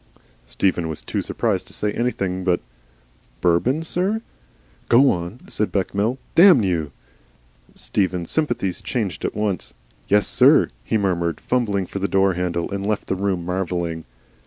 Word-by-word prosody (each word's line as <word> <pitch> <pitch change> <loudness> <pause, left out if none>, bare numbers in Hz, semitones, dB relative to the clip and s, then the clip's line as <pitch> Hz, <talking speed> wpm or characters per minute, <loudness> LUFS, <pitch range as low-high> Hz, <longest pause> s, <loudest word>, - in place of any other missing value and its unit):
Stephen 85 +2 0
was 80 - -5
too - - -2
surprised - - -1
to - - -10
say 105 - -1
anything 95 -6 -2
but 90 -2 +2 0.8
"Bourbon, 105 - +2
sir?" 185 +6 0 0.7
"Go 130 +3 +6
on," 90 +7 -5
said 105 - -1
Bechamel. 100 +5 0 0.2
"Damn 175 - +7
you!" 85 -6 -1 0.8
Stephen's 90 -4 -2
sympathies 145 - -1
changed 100 - -3
at - - -3
once. 100 - -2 0.3
"Yessir," 105 0 +5
he 90 - 0
murmured, 85 -5 -1
fumbling 105 -6 0
for 100 - -6
the 100 - 0
door 95 -1 +2
handle, 85 -1 -2
and 100 0 -3
left 105 0 -1
the - - -1
room, 95 -2 -1
marvelling. 85 -3 -2
95 Hz, 140 wpm, -22 LUFS, 90-110 Hz, 0.8 s, Damn